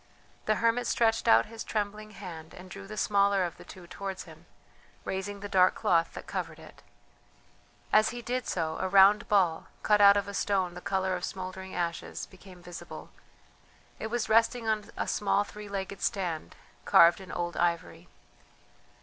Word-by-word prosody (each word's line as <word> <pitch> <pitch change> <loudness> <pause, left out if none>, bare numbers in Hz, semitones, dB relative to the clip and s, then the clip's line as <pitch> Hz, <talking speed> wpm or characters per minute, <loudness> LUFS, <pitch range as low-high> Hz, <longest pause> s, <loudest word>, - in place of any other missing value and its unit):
The 215 - +3
hermit 230 +2 +1
stretched 225 -1 +1
out 115 +1 +6
his 225 0 -8
trembling 215 0 -3
hand 175 -6 -10
and 180 0 -12
drew 195 +1 -9
the 215 +1 -8
smaller 200 -2 +2
of 175 - -6
the - - -12
two 185 -2 -12
towards 190 +2 -6
him, 165 0 -15 0.6
raising 200 +1 -4
the 205 - -5
dark 185 -2 +4
cloth 165 -1 +1
that - - -7
covered - - -4
it. - - -15 1.1
As 215 0 +5
he 240 0 -7
did 250 +1 -2
so, 160 -3 -2
a 190 - -1
round 200 +2 +6
ball, 185 -6 +2 0.2
cut 210 -1 +4
out 200 0 +8
of 200 - -1
a 200 - -6
stone 190 -3 0
the 180 - -9
colour 190 -1 -1
of 180 - -6
smouldering 190 0 -6
ashes, 170 -1 -3
became 185 -1 -16
visible; 175 -1 -9 0.9
it - - -3
was 240 +1 -2
resting 230 +1 +2
on 215 -1 -1
a - - -2
small 205 0 +1
three 210 0 -10
legged 195 0 -5
stand 170 - -2 0.3
carved 170 +3 +6
in 190 - -10
old 175 0 -3
ivory. 170 -1 -1
195 Hz, 175 wpm, -29 LUFS, 180-210 Hz, 1.1 s, out